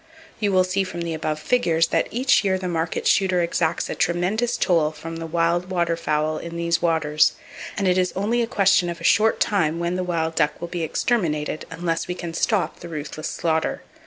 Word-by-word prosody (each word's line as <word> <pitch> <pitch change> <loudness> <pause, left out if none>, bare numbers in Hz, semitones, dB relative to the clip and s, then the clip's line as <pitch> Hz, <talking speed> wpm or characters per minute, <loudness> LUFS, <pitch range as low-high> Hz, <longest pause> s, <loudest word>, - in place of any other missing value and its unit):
You 205 -2 +1
will 185 -1 +4
see 185 +2 0
from 175 -2 -6
the 170 -1 -3
above 155 -1 -2
figures 165 -6 +2
that - - +1
each 250 0 +2
year 190 -2 +1
the 185 -1 -4
market 165 -1 -2
shooter 185 -2 +3
exacts 170 -1 0
a - - -3
tremendous 200 +8 0
toll 165 -5 +2
from 160 +2 -8
the 165 0 -5
wild 170 +2 0
water 170 -2 0
fowl 155 -1 -1
in 170 0 -7
these 170 0 0
waters, 155 -3 +2 0.4
and 195 - 0
it 185 0 +3
is 180 -1 +1
only 220 +5 +1
a 230 - 0
question 195 -5 +3
of 170 -1 -5
a - - -11
short 220 +5 +3
time 165 -6 +1
when 170 +1 -1
the 185 - -1
wild 165 -2 -1
duck 150 -2 0
will 170 - -6
be 175 -1 -4
exterminated, 155 -4 -1
unless 165 0 -2
we 180 - -3
can 170 -2 -6
stop 195 +3 0
the 170 - -9
ruthless 155 0 -5
slaughter. 160 -1 -1
170 Hz, 210 wpm, -23 LUFS, 165-185 Hz, 0.4 s, will